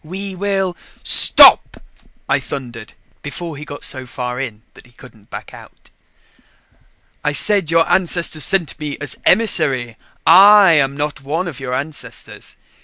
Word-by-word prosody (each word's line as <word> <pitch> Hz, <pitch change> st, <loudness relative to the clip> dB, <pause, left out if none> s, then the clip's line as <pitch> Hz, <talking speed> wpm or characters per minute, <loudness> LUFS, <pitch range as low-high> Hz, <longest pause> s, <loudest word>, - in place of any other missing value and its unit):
We 190 Hz, +4 st, -8 dB
will 195 Hz, -1 st, -3 dB, 0.2 s
" -, -, -33 dB
"Stop!" -, -, +6 dB, 0.5 s
I -, -, 0 dB
thundered 120 Hz, -5 st, -9 dB, 0.3 s
before 160 Hz, +2 st, -8 dB
he 145 Hz, -, -10 dB
got 145 Hz, -1 st, -10 dB
so 130 Hz, -1 st, -3 dB
far 125 Hz, 0 st, -6 dB
in 110 Hz, -5 st, -8 dB
that -, -, -18 dB
he 120 Hz, -, -26 dB
couldn't 115 Hz, -4 st, -19 dB
back -, -, -10 dB
out. -, -, -17 dB, 1.3 s
"I 150 Hz, -, -1 dB
said 195 Hz, +2 st, +1 dB
your 165 Hz, 0 st, +2 dB
ancestors 170 Hz, -4 st, -1 dB
sent 175 Hz, +1 st, -1 dB
me 150 Hz, -2 st, -6 dB
as 145 Hz, -2 st, -4 dB
emissary 145 Hz, -, +1 dB, 0.3 s
I 195 Hz, +2 st, +6 dB
am 140 Hz, -3 st, +1 dB
not 145 Hz, -1 st, -5 dB
one 160 Hz, +6 st, -4 dB
of 145 Hz, -6 st, -8 dB
your 125 Hz, -2 st, -5 dB
ancestors. 135 Hz, -3 st, -7 dB
150 Hz, 150 wpm, -16 LUFS, 130-175 Hz, 1.3 s, Stop